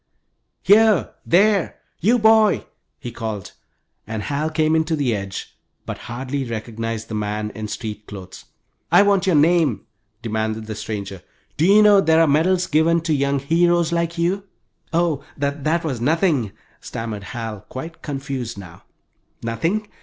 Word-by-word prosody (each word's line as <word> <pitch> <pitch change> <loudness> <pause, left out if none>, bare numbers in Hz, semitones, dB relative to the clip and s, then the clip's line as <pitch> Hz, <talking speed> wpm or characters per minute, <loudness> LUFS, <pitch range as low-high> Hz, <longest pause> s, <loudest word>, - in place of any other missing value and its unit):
"Here, 215 -1 +4
there, 200 +1 +3 0.2
you 225 +8 +3
boy," 220 -1 +4 0.3
he 125 -5 -7
called, 110 -4 -5 0.6
and 110 -1 -4
Hal 145 +5 -1
came 155 0 +1
in 160 - +3
to 160 0 0
the 135 -7 0
edge, 100 -1 -6 0.3
but - - -6
hardly 130 +3 -3
recognized 115 -1 -4
the - - -7
man 105 0 -2
in 110 +1 -6
street 105 -1 -6
clothes. 95 -3 -10 0.5
"I - - +7
want 200 -2 +2
your 180 - +3
name," 155 -4 +3 0.4
demanded 110 -1 -2
the 110 - -5
stranger. 105 -3 -6 0.3
"Do 160 - +2
you 210 +2 +7
know 205 -2 +7
there 160 -3 +4
are 165 - +6
medals 175 +5 +2
given 165 +1 +2
to 165 -1 0
young 140 0 +1
heroes 170 +4 +2
like 170 0 -1
you?" 185 +4 0 0.5
"Oh, 165 -4 +1
that 145 +4 -1
was 135 -8 -3
nothing," 145 - +1 0.3
stammered 115 -4 -6
Hal, 110 -2 -6
quite 165 +6 -8
confused 135 -5 -5
now. 90 -4 -11 0.6
"Nothing! 165 - -1
140 Hz, 150 wpm, -21 LUFS, 110-170 Hz, 0.6 s, I